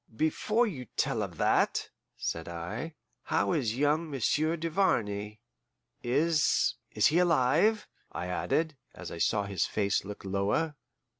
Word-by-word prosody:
"Before 210 - +1
you 145 - -5
tell - - +1
of - - -5
that," - - +1 0.3
said 80 +1 -3
I, 105 - -5 0.3
"how 165 +3 +1
is 125 -8 0
young 150 +3 +1
Monsieur 150 +4 +1
Duvarney? 110 - 0 0.6
Is 150 +5 +2 0.2
is - - +1
he 165 +3 +5
alive?" 175 - +3 0.2
I 85 - -4
added, 150 - -1 0.2
as - - -8
I 85 - -6
saw 105 +3 +2
his 100 -1 -1
face 100 -2 0
look 100 0 -8
lower. 100 +11 0
140 Hz, 135 wpm, -30 LUFS, 105-165 Hz, 0.6 s, he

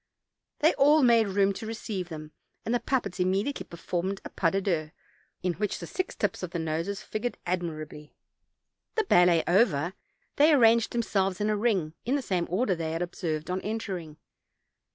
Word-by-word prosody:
They 315 +3 +5
all 295 +2 +6
made 230 -3 +5
room 195 0 +2
to 220 - -7
receive 210 -5 -4
them, 155 -2 -8 0.3
and 230 - 0
the 245 - +2
puppets 240 -10 -2
immediately 195 +9 0
performed 180 +3 -3
a - - -5
pas 165 -3 +1
de 195 - +2
douze, 170 -6 -1 0.5
in 180 -1 +1
which 205 +2 -2
the - - -7
six 370 - -3
tips - - -1
of 180 - -4
the 175 - -4
noses 165 +5 -2
figured 240 +3 -3
admirably. 155 -4 -4 0.8
The 445 - +2
ballet 175 - +5
over, 175 -4 +3 0.4
they 300 +2 +6
arranged 230 -4 +5
themselves 195 -5 0
in 210 +1 +1
a - - +1
ring, 200 -8 0
in 260 - 0
the 280 - -1
same 180 -5 -1
order 195 +3 +1
they 165 -2 -3
had 165 +2 -1
observed 165 -2 -3
on 185 +1 -1
entering. 190 -8 -4
190 Hz, 175 wpm, -28 LUFS, 170-225 Hz, 0.8 s, all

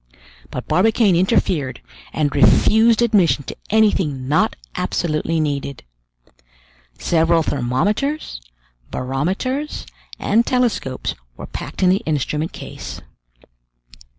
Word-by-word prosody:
But - - -6
Barbicane 210 0 +3
interfered 170 - +1 0.3
and 145 -3 0
refused 220 - +5
admission 175 - +3
to - - -7
anything 190 -12 +2
not 150 +3 +2 0.2
absolutely 165 0 -1
needed. 140 -2 -2 1.1
Several 165 - +2
thermometers, 155 - -1 0.5
barometers, 185 - -2 0.3
and 225 +3 +2
telescopes 240 - -1 0.2
were - - -7
packed - - -6
in 180 - +5
the 190 - +2
instrument 150 +1 -1
case. - - -8
170 Hz, 95 wpm, -20 LUFS, 140-220 Hz, 1.1 s, refused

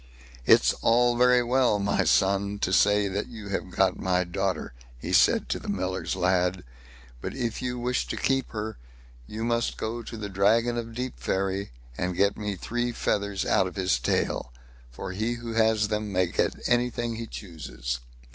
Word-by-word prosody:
"It's - - +6
all 120 +1 +4
very 125 0 +5
well, 125 -3 +3
my 100 0 +1
son, 100 +1 +2
to 95 - +1
say 105 +1 +4
you 100 +2 -5
have 95 -1 -3
got 95 +1 +1
my 90 -1 +1
daughter", 95 -4 -2 0.2
he - - -5
said - - +4
to - - -1
the - - -10
miller's 95 0 -2
lad; 90 0 +1 0.6
"but - - -5
if 120 -4 -2
you 125 0 -2
wish 125 +1 -1
to - - -4
keep 135 -1 0
her, 110 - -5 0.5
you 110 +1 -5
must 115 0 0
go 115 +2 -3
to 115 - -8
the 105 -1 -4
Dragon 110 +5 +2
of 115 -1 -5
Deepferry, 100 -6 -2 0.3
and 90 -1 -2
get 100 0 +3
me 105 -1 -3
three 120 +5 -2
feathers 100 -4 -1
out 95 - +3
of 90 - -8
his 90 -10 +1
tail; - - -1 0.4
for - - -6
he 110 +5 -1
who 115 -1 -6
has 110 -1 +3
them 105 -1 -2
may 95 -1 +2
get - - 0
anything 120 -1 0
he 115 0 -5
chooses." 65 - -5
105 Hz, 175 wpm, -27 LUFS, 95-120 Hz, 0.6 s, It's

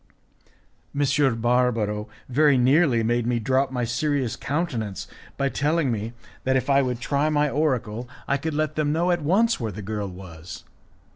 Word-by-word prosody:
M. 140 -4 +2
Barbaro 115 -3 +1 0.2
very 145 +1 +4
nearly 130 -1 +4
made 120 +1 0
me 120 -1 +1
drop 130 +4 +1
my 125 -2 -2
serious 130 +1 -1
countenance 125 - -3 0.3
by 140 - +1
telling 145 0 +1
me 110 +1 -3 0.3
that 130 0 +1
if 130 +2 -1
I 140 0 +5
would 125 -2 -2
try 145 +4 0
my 150 -1 +2
oracle 125 -6 -1 0.2
I 140 - +2
could 155 +2 -3
let 155 0 0
them 150 -1 0
know 170 +3 +1
at 175 -1 0
once 205 +10 +2
where 115 -4 -3
the 105 +1 -8
girl 105 0 -3
was. 85 -3 -10
130 Hz, 165 wpm, -24 LUFS, 115-150 Hz, 0.3 s, I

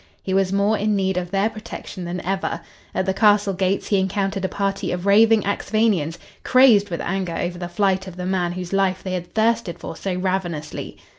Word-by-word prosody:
He 190 - -2
was 190 -1 +2
more 200 +2 +2
in 210 +1 +1
need 190 -1 0
of 180 -1 -2
their 195 +2 +1
protection 215 -4 -7
than 175 +1 -4
ever. 190 -3 -2 0.3
At 185 - 0
the 190 - +1
castle 205 0 +3
gates 190 +1 -1
he 200 - +3
encountered 195 +1 -1
a 190 - 0
party 195 -1 -2
of 180 +1 -3
raving 220 +1 +5
Axphainians, 200 -5 0 0.3
crazed 240 -6 +5
with 170 - -3
anger 185 -2 -2
over 175 0 -3
the 175 -1 -5
flight 190 0 0
of 185 - -8
the 180 0 -5
man 180 -2 0
whose 180 0 -6
life 190 -1 +1
they 185 - -3
had 175 -1 -5
thirsted 225 -5 +1
for - - -7
so 190 -2 -3
ravenously. 180 -4 -3
190 Hz, 205 wpm, -22 LUFS, 180-200 Hz, 0.3 s, raving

